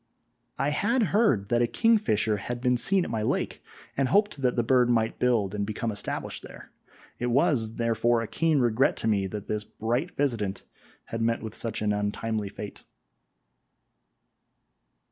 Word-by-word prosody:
I 140 - +1
had 225 +11 +1
heard 160 - +3
that 120 0 +2
a 120 - +3
kingfisher 115 - +2
had 120 +4 -4
been 125 0 +2
seen 180 +10 +2
at - - -5
my 110 -2 -1
lake, 105 - -1 0.3
and 135 -1 +1
hoped 205 -7 +2
that 125 -2 +1
the 120 - +1
bird 125 0 +3
might 115 -2 +1
build 115 -6 +2
and 105 -1 -1
become 110 +2 -2
established 105 - -4
there; - - -12 0.5
it 125 - -1
was, 120 -3 +2
therefore, 115 0 +1
a - - -5
keen 165 +3 +1
regret 125 +1 +2
to - - -2
me 100 -3 +2
that 105 +1 -6
this 105 -1 -2
bright 120 +11 -3
visitant 110 -9 -1 0.5
had 115 - -2
met 115 0 0
with 110 -2 -6
such 115 -2 -3
an 105 -1 +2
untimely 105 +1 -2
fate. 105 +1 -8
115 Hz, 165 wpm, -27 LUFS, 105-130 Hz, 0.5 s, heard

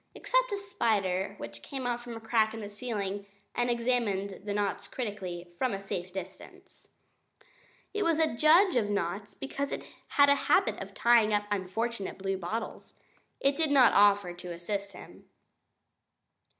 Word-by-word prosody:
Except - - +1
a 405 - 0
spider 210 - 0
who - - -5
came 115 - -7
out 240 0 -2
of 235 - -6
a - - -6
crack 225 -1 +1
in - - -6
the 205 - -6
ceiling 205 -3 -4 0.3
and 245 0 0
examined 230 -5 0
the 205 - -3
knots 205 -1 -1
critically, 185 -7 -5
from 255 -4 +1
a - - -5
safe 185 -2 -5
distance. 190 0 -10 1.1
It 420 - -1
was 335 -5 +2
a 320 -6 +2
judge 330 +7 +5
of 220 -4 +2
knots 200 +1 -2
because 275 +1 -4
it - - -4 0.2
had 285 0 +5
a - - +8 0.2
habit - - +3
of - - -8
tying 230 -3 +5
up 205 0 0
unfortunate 205 +2 -2
bluebottles. 195 +3 -4 0.4
It 275 +1 +2
did 320 -1 +1
not 270 -4 +6
offer 200 -3 +4
to 175 0 -8
assist 200 +3 -4
him. - - -13
210 Hz, 160 wpm, -30 LUFS, 195-250 Hz, 1.1 s, a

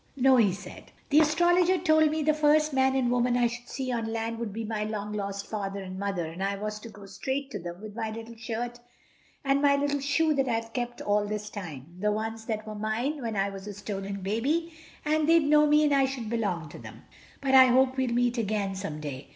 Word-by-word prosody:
"No," 265 0 +5
he 215 -5 +4
said, 190 - -10 0.2
"the 295 - +7
Astrologer 345 +4 +4
told 315 -2 +4
me 310 0 -1
the 310 +1 +3
first 305 0 +3
man 265 0 +3
and 250 -2 +1
woman 245 0 +2
I 245 - +3
should 235 +1 -4
see 260 -2 -3
on 230 -2 -2
land 225 0 -3
would 230 -3 -3
be 225 +2 -4
my 215 -1 -2
long 210 -1 -4
lost 200 -1 -4
Father 200 -2 -4
and 185 0 -7
Mother, 195 -4 -2
and 165 +4 -5
I 200 0 0
was 210 +1 -4
to 230 - -10
go 205 -2 -12
straight 265 +9 -4
to 205 - -4
them 175 0 -7
with 210 0 -9
my 225 -1 -2
little 225 +1 -8
shirt 235 +2 -4 0.7
and 275 +1 +2
my 285 -1 +5
little 285 0 0
shoe 295 +3 +2
that 270 -2 +1
I've 230 -1 -2
kept 240 -1 -3
all 205 0 +1
this 210 0 -4
time, 165 -4 -8
the 210 +2 +1
ones 220 +1 -3
that 220 -1 -3
were 215 - -6
mine 225 +8 -2
when 225 -3 -3
I 195 0 0
was 195 +1 -9
a 205 - -5
stolen 200 -1 -5
baby, 280 - -1 0.3
and 310 +1 +2
they'd 330 -2 +5
know 300 0 +5
me 300 +1 +5
and 295 -1 +3
I 275 -1 +4
should 255 -5 -4
belong 200 -8 -1
to - - -10
them. - - -11 0.4
But 270 -1 -1
I 260 -1 +10
hope 260 +1 +3
we'll 260 -2 0
meet 245 0 +1
again 205 -2 -1
some 175 -6 -5
day. 140 -2 -6
230 Hz, 235 wpm, -28 LUFS, 205-275 Hz, 0.7 s, I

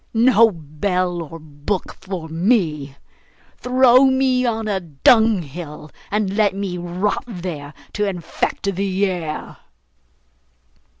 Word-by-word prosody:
No 230 -1 +6
bell 175 +2 -2
or 165 0 -8
book 155 +4 -4
for 185 -4 -5
me! 160 - 0 0.6
Throw 255 +1 +5
me 260 -1 +2
on 225 -1 -1
a 200 -2 0
dunghill, 170 - +1 0.2
and 205 -2 -1
let 205 -2 +2
me 195 -2 -3
rot 180 +4 -2
there, 170 -8 -6 0.2
to 210 - 0
infect 195 +2 -2
the 195 +1 0
air! 170 -5 -4
190 Hz, 110 wpm, -20 LUFS, 165-215 Hz, 0.6 s, No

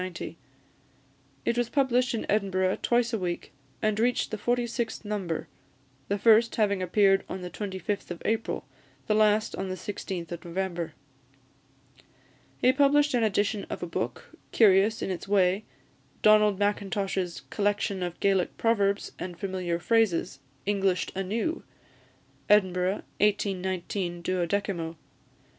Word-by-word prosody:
It 235 - +1
was 240 -1 0
published 255 -3 +2
in 225 - -3
Edinburgh 190 -2 +1
twice 240 0 +2
a 225 - 0
week, 175 -2 -4 0.3
and 215 0 +1
reached 245 +1 +1
the 215 - -2
forty 240 +2 +1
sixth 235 -1 -3
number; 195 -6 -3 0.6
the 200 - 0
first 225 +2 +5
having 200 -3 +1
appeared 195 +1 +3
on 185 - -5
the 180 0 -6
25th 200 0 -4
of 175 -1 -5
April, 225 +1 -1 0.4
the - - +1
last 215 0 +3
on 190 0 -4
the 185 - -2
16th 185 -2 -5
of 170 -2 -6
November. 175 -2 -3 1.6
He 255 - +4
published 290 +1 +4
an 245 - +2
edition 205 -1 0
of - - -5
a - - 0
book, 165 - -5 0.2
curious 210 +1 +4
in - - -2
its 185 +1 -5
way 195 0 +2 0.6
Donald 210 -2 +6
Mackintosh's 195 -3 -1
"Collection 205 -2 0
of 175 -1 -4
Gaelic 195 -3 +1
Proverbs, 205 -3 +1
and 180 -2 -6
Familiar 185 -3 -2
Phrases; 175 - +1 0.3
Englished 195 -2 +1
anew!" 220 - -2 0.9
Edinburgh, 190 -1 +3 0.2
1819, 190 -3 -1
12mo. 175 -1 -1
200 Hz, 130 wpm, -27 LUFS, 185-215 Hz, 1.6 s, Donald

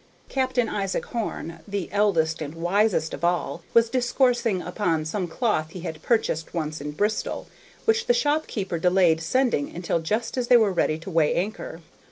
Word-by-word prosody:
Captain 260 -3 +1
Isaac 195 -3 -2
Horn, 170 -8 -4
the 200 -3 -3
eldest 165 -6 +2
and 150 +1 -5
wisest 175 0 +1
of - - -7
all, 175 0 0
was 230 0 +6
discoursing 245 -3 +1
upon 175 -4 -1
some 180 +3 -2
cloth 170 -5 0
he 180 - -7
had 160 -3 -6
purchased 175 -10 0
once 155 -2 -3
in 145 - -4
Bristol, 205 +8 -1 0.4
which 455 +1 +2
the - - +5
shopkeeper 290 - 0
delayed 180 -2 +3
sending 235 - +1
until 170 -1 -1
just 215 +10 -2
as 245 - -1
they 245 - +7
were 215 -4 +3
ready 155 -3 +1
to 165 +4 -8
weigh 160 -3 +3
anchor. 185 -3 -3
190 Hz, 170 wpm, -25 LUFS, 165-230 Hz, 0.4 s, they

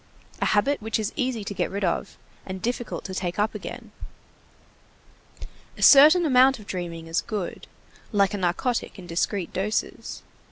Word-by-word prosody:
A - - +2
habit 245 +6 +2
which 220 0 -1
is 215 -2 -3
easy 255 -6 -1
to 200 - -5
get - - -1
rid 200 +1 -4
of, 185 +2 -2 0.3
and 190 0 -6
difficult 240 +3 -3
to 190 - -6
take 180 -1 -3
up 210 +1 +1
again. - - -8 1.9
A - - -3
certain 310 +5 +8
amount 265 -1 +5
of 210 - -13
dreaming 170 -4 -5
is 165 +1 -1
good, 205 -5 -5 0.4
like 200 -1 +2
a - - -1
narcotic 190 +9 -1
in 185 - -10
discreet 175 +2 -2
doses. 205 +3 -3
205 Hz, 160 wpm, -25 LUFS, 185-245 Hz, 1.9 s, certain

